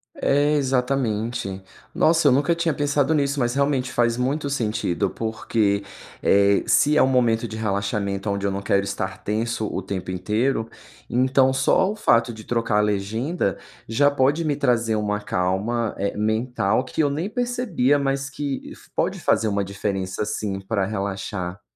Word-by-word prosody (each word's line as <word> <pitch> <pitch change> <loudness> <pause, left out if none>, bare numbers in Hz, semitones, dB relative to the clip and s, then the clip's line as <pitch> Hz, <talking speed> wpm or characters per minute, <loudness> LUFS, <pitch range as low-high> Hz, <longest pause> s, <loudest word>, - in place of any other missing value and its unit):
É, 145 +2 +2
exatamente. 125 -7 -1 0.3
Nossa, 165 -2 +4
eu - - +6
nunca 145 +5 +2
tinha 165 -2 0
pensado 145 +1 +1
nisso, 140 -1 0
mas 120 -1 +1
realmente 135 -3 0
faz 120 -1 +2
muito 140 +3 -1
sentido. 110 -9 -1
Porque, 110 -2 -1 0.4
eh, 100 0 +4
se 150 +1 +4
é - - +6
um - - +5
momento 120 -3 +2
de 110 - -7
relaxamento 100 -1 -2
aonde 100 0 -1
eu 100 - +1
não 100 +1 -3
quero 100 0 +1
estar - - -4
tenso 110 +1 -1
o - - -2
tempo 95 -1 -5
inteiro, 110 +6 -1 0.4
então 130 +1 +3
só 135 +8 +3
o 210 - -3
fato 115 - +2
de 110 - -10
trocar 115 -2 0
a - - +5
legenda 105 - -1 0.3
já 145 +6 +3
pode 140 +4 +2
me 150 -3 0
trazer 120 -5 +1
uma 105 0 -1
calma, 105 +5 -1
eh, 100 +1 -2
mental 110 +1 0
que 130 - -2
eu 145 - +2
nem 160 +8 -2
percebia, 245 - +1
mas 135 0 -1
que 140 -1 -5
fa - - -20 0.2
pode - - -9
fazer 110 - +2
uma 100 -1 0
diferença, 95 0 -3
sim, 100 -2 -3
pra 100 0 -1
relaxar. 95 -2 -4
115 Hz, 165 wpm, -23 LUFS, 100-140 Hz, 0.4 s, eu